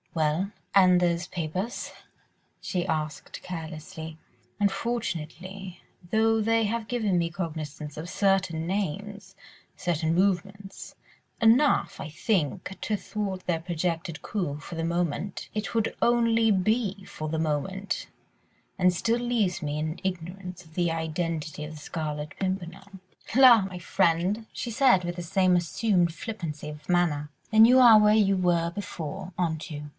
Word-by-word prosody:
"Well? 160 +5 0 0.2
And 185 -2 +6
those 175 0 +1
papers?" 180 +8 -4 0.7
she 180 -1 -2
asked 155 -1 -3
carelessly. 160 -1 -7 0.4
"Unfortunately, 195 -3 -3 0.3
though 220 +2 +3
they 225 +1 +2
have 220 +1 -2
given 215 -7 +1
me 170 0 0
cognisance 155 -4 -5
of 160 +3 -6
certain 185 -5 +1
names... 200 +1 -3 0.4
certain 165 -2 0
movements... 195 +2 -1 0.4
enough, 235 +6 +4
I 145 - -5
think, 180 - -1
to 210 - -1
thwart 195 -3 -4
their 165 -2 0
projected 170 -1 -3
coup 175 -9 -2
for 165 - -8
the 165 - -2
moment, 170 +2 -2
it 205 -3 -3
would 225 -1 +1
only 230 -2 +3
be 200 0 0
for 155 0 -6
the 160 +1 -1
moment, 190 +6 -2 0.7
and 180 -1 +4
still 230 +6 +1
leaves 230 -7 0
me 150 -1 -2
in 155 +2 -3
ignorance 180 0 -5
of 160 - -19
the 175 -1 +1
identity 160 -1 -3
of 150 - -6
the - - -9
Scarlet 150 -1 -4
Pimpernel." 190 +1 -4 0.4
"La! 250 -4 +8
my 190 -1 -5
friend," 185 +5 +1
she 240 - -5
said, 230 -6 +4
with 175 0 -3
the 175 - -5
same 185 +1 +3
assumed 175 0 +1
flippancy 165 -6 -6
of 150 +2 -9
manner, 160 -5 +1 0.2
"then 220 0 +7
you 250 +2 +6
are 235 -4 +9
where 210 0 +5
you 200 -3 +4
were 175 -2 +1
before, 180 -1 -6
aren't 165 -1 -2
you? 150 0 -6
180 Hz, 140 wpm, -27 LUFS, 160-205 Hz, 0.7 s, are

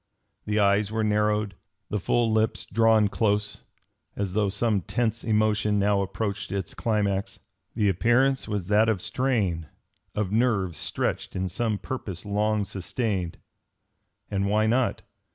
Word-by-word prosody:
The 105 0 0
eyes 100 +1 +3
were 110 0 0
narrowed, 105 -1 +1 0.4
the 105 - 0
full 115 +4 +1
lips 110 0 +1
drawn 115 -2 +4
close, 105 -1 0 0.5
as 100 -3 -2
though 105 -1 +2
some 105 0 +1
tense 115 +4 -1
emotion 105 -1 +2
now 100 0 +2
approached 100 +1 -3
its 95 -3 -3
climax. 100 -2 -1 0.4
The 105 -3 +2
appearance 120 +8 +2
was 105 -4 -2
that 105 +3 +3
of 110 -4 +1
strain, 100 - 0 0.5
of 105 -3 -1
nerves 105 - +1
stretched - - -2
in 95 0 -1
some 110 +2 -1
purpose 100 -6 -6
long 105 0 +1
sustained. 95 -2 -3 0.9
And 100 -1 0
why 105 +2 +2
not? 120 +3 +1
105 Hz, 135 wpm, -26 LUFS, 100-110 Hz, 0.9 s, drawn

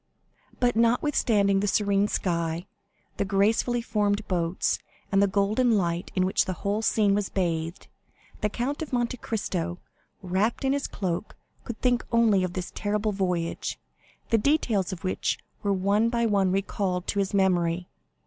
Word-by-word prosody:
But 245 -2 +2
notwithstanding 230 -4 +3
the 205 - 0
serene 200 0 +2
sky, 170 -3 -1 0.5
the - - +1
gracefully 215 +5 +1
formed 210 -1 0
boats, 175 -1 0 0.3
and 195 0 +4
the 200 - +5
golden 210 +4 +2
light 170 -2 -1
in 185 - +2
which 190 - +2
the 185 - -2
whole 205 +2 +1
scene 210 -2 +3
was 205 -1 0
bathed, 165 -2 -2 0.5
the 210 - 0
Count 255 +8 -3
of 315 - -5
Monte 245 0 0
Cristo, 180 -7 -3 0.5
wrapped 195 +8 0
in 265 - +3
his 280 0 -1
cloak, 185 0 -3 0.3
could 235 - -6
think 245 -1 +2
only 225 -5 +4
of 180 -1 -2
this 180 -1 -4
terrible 210 +1 -1
voyage, 180 -4 -2 0.5
the 225 - +4
details 220 - +1
of 180 -3 -7
which 185 - -1 0.2
were 200 - 0
one 200 +4 +2
by 235 0 +1
one 200 -4 +2
recalled 190 -1 -1
to 200 - -1
his 200 0 0
memory. 180 -2 +2
200 Hz, 160 wpm, -26 LUFS, 185-225 Hz, 0.5 s, the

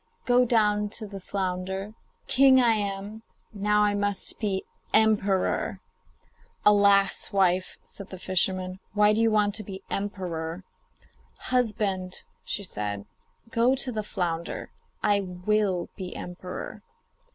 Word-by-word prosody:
Go 250 0 +4
down 210 -3 +2
to 220 - -4
the 200 -1 -8
flounder; 190 +1 -3 0.3
king 265 0 +6
I 235 -2 +5
am, 205 +1 -3 0.3
now 210 +1 +2
I 205 0 +3
must 205 -1 -2
be 195 -3 -1 0.3
emperor.' 210 -3 +2 0.9
'Alas! 200 -1 +4
wife,' 185 -2 +2
said 200 - -10
the 190 - -7
fisherman, 185 0 0 0.2
'why 210 0 +5
do 220 - +1
you 230 - +4
want 210 -1 +2
to 215 0 -3
be 190 -1 -8
emperor?' 180 -4 -3 0.7
'Husband,' 210 -7 -1 0.3
said 105 - -4
she, 230 - -32
'go 245 +2 +3
to 260 -1 0
the 220 -2 -2
flounder; 175 -5 -3 0.3
I 205 -1 +4
will 185 0 0
be 185 -2 -6
emperor. 180 +1 -7
200 Hz, 125 wpm, -27 LUFS, 185-215 Hz, 0.9 s, king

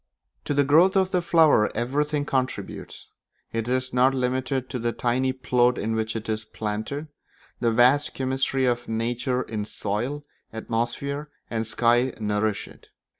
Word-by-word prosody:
To 145 - -1
the 145 - +4
growth 165 +8 +5
of 190 -1 +2
the 180 - +2
flower 160 -10 +4
everything 145 +5 0
contributes; 130 -3 -3 0.5
it 115 0 -2
is 130 0 -1
not 130 +2 +4
limited 130 +1 -1
to 125 - -3
the 120 0 -1
tiny 130 +2 +1
plot 125 -1 +2
in 110 +2 -1
which 110 0 -2
it 115 0 -4
is 110 -1 -2
planted: 110 +8 -4 0.5
the 120 -1 +2
vast 130 +6 +4
chemistry 130 0 0
of 120 -1 0
nature 120 +3 -1
in 110 -2 -4
soil, 110 +8 -3 0.3
atmosphere, 120 +6 -3 0.2
and 115 -1 -1
sky 120 +3 +2
nourish 105 -1 -1
it. - - -17
125 Hz, 150 wpm, -25 LUFS, 115-135 Hz, 0.5 s, growth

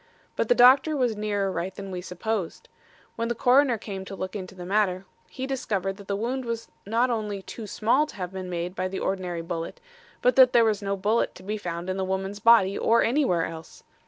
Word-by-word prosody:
But - - 0
the 245 - +5
doctor 265 +5 +6
was 245 -4 +1
nearer 205 -2 -1
right 180 +2 -4
than 195 -1 -7
we 180 -1 -4
supposed. 180 +1 -4 0.5
When 230 - -1
the 235 - -1
coroner 250 +1 +4
came 200 -3 -6
to 195 - -7
look 185 +1 -5
into 190 -2 -6
the 180 -1 -8
matter, 195 -1 +1 0.2
he 260 - -5
discovered 200 -8 -2
that 200 -2 -13
the 200 - -1
wound 245 +5 -2
was 230 -1 -4 0.2
not 235 +4 +2
only 210 -4 -3
too 220 +1 -8
small 245 +9 +2
to - - -12
have 180 -1 -5
been 185 -1 -5
made 175 0 -3
by 185 0 -2
the 190 +1 -5
ordinary 180 -3 -2
bullet, 165 -1 -5 0.4
but 250 - +4
that 255 -1 +7
there 235 -1 +6
was 210 -2 +1
no 200 0 -2
bullet 210 +4 0
to 185 - -13
be 210 +3 -3
found 175 -4 -5
in 185 0 -2
the 190 - -1
woman's 190 +2 -3
body 205 -3 +5
or 230 +1 +3
anywhere 230 - +2
else. 160 -1 -10
200 Hz, 220 wpm, -26 LUFS, 185-230 Hz, 0.5 s, that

